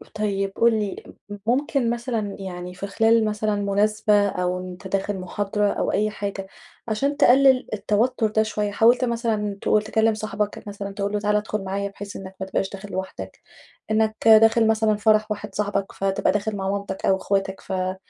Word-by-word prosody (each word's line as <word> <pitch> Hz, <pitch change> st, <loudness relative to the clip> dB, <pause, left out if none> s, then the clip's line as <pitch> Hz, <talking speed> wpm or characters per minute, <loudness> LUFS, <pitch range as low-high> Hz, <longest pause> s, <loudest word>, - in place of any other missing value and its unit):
طيب 195 Hz, -2 st, -1 dB
قُل 235 Hz, 0 st, +4 dB
لي، 205 Hz, -2 st, -4 dB, 0.3 s
م 205 Hz, -, -6 dB
ممكن 255 Hz, +1 st, +1 dB
مثلًا 235 Hz, -4 st, -2 dB
يعني 180 Hz, -1 st, -6 dB
في 195 Hz, +2 st, -6 dB
خلال 225 Hz, +2 st, +3 dB
مثلًا 210 Hz, 0 st, -1 dB
مناسبة 205 Hz, +1 st, +2 dB
أو 180 Hz, -1 st, -1 dB
وأنت 185 Hz, +2 st, -9 dB
داخل 195 Hz, +1 st, -2 dB
محاضرة 205 Hz, +2 st, -1 dB
أو -, -, -1 dB
أي 215 Hz, +1 st, +1 dB
حاجة، 200 Hz, -2 st, -5 dB, 0.4 s
عشان 275 Hz, +7 st, -1 dB
تقلل 265 Hz, 0 st, +5 dB
التوتُّر 220 Hz, +3 st, +1 dB
ده 215 Hz, +1 st, +1 dB
شوية 210 Hz, -1 st, -2 dB
حاولت 240 Hz, +4 st, +4 dB
مثلًا 225 Hz, -4 st, -1 dB
تقول 210 Hz, -, +3 dB
تكلّم 220 Hz, +1 st, +2 dB
صاحبك 210 Hz, -1 st, -4 dB
مثلًا 200 Hz, -1 st, -6 dB
تقول 200 Hz, 0 st, -3 dB
له 210 Hz, -, +1 dB
تعالَ 210 Hz, 0 st, +1 dB
ادخل 210 Hz, -1 st, -2 dB
معايا 200 Hz, +1 st, -3 dB
بحيث 200 Hz, +1 st, -9 dB
إنك 190 Hz, 0 st, -8 dB
ما 190 Hz, -, -3 dB
تبقاش 190 Hz, 0 st, -1 dB
داخل 200 Hz, +1 st, -9 dB
لوحدك، 95 Hz, -, -6 dB, 0.5 s
إنك 220 Hz, 0 st, +2 dB
داخل 225 Hz, +1 st, +6 dB
مثلًا 220 Hz, -1 st, +2 dB
فرح 215 Hz, 0 st, +2 dB
واحد 205 Hz, -1 st, -5 dB
صاحبك 200 Hz, -1 st, -1 dB
فتبقى 195 Hz, 0 st, 0 dB
داخل 210 Hz, +1 st, -2 dB
مع 195 Hz, -1 st, -2 dB
مامتك 200 Hz, -1 st, -3 dB
أو 190 Hz, -, +3 dB
أخواتك 195 Hz, 0 st, -2 dB
ف -, -, -10 dB
ما 185 Hz, 0 st, -1 dB
210 Hz, 180 wpm, -23 LUFS, 195-220 Hz, 0.5 s, داخل